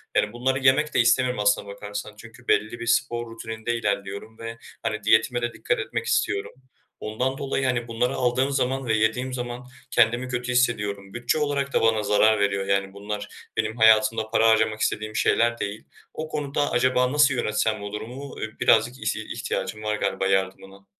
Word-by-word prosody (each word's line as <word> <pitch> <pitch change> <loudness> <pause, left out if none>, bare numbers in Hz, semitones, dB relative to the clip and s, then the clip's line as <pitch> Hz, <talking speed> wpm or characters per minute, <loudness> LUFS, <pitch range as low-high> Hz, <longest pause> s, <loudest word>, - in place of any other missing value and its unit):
Yani 105 - +2
bunları 130 +2 0
yemek 140 +3 +3
de - - +2
istemiyorum 125 0 +3
aslına 105 0 +2
bakarsan. 105 +1 -7
Çünkü 115 +2 -14
belli 110 +2 +1
bir 115 - -6
spor 120 0 +1
rutininde 110 +1 -4
ilerliyorum 100 0 -3
ve, 115 0 -6 0.3
hani, 110 -2 -2
diyetime 110 +3 +3
de 120 0 -2
dikkat - - -1
etmek - - -3
istiyorum. 420 -2 0 0.5
Ondan 125 +5 -2
dolayı, 135 -1 -2
hani, 125 -2 0
bunları 120 +3 0
aldığım 130 +2 +1
zaman 135 0 0
ve 115 - +1
yediğim 110 +4 0
zaman 125 0 -5 0.3
kendimi 120 +3 +3
kötü 125 0 -3
hissediyorum. 100 -5 0
Bütçe 120 +5 0
olarak 140 -2 -1
da - - +3
bana 110 -1 +2
zarar 105 +1 +4
veriyor. 100 -1 0
Yani 100 0 0
bunlar 105 +1 -5 0.3
benim 110 +1 -1
hayatımda 110 0 +4
para 115 0 +4
harcamak 110 -1 +2
istediğim 110 0 -1
şeyler 120 0 +2
değil. 100 +1 -4 0.3
O 155 - -5
konuda 145 -1 -1
acaba 125 0 +2
nasıl 145 -1 +4
yönetsem 110 -3 0
bu 100 0 -6
durum? 110 +2 -6 0.3
I 110 - -7
birazcık 120 +2 +3
ihti - - -1
ihtiyacım 110 0 -4
var 105 0 0
galiba 95 - -1
yardımına. 95 0 -2
115 Hz, 175 wpm, -24 LUFS, 105-125 Hz, 0.5 s, zarar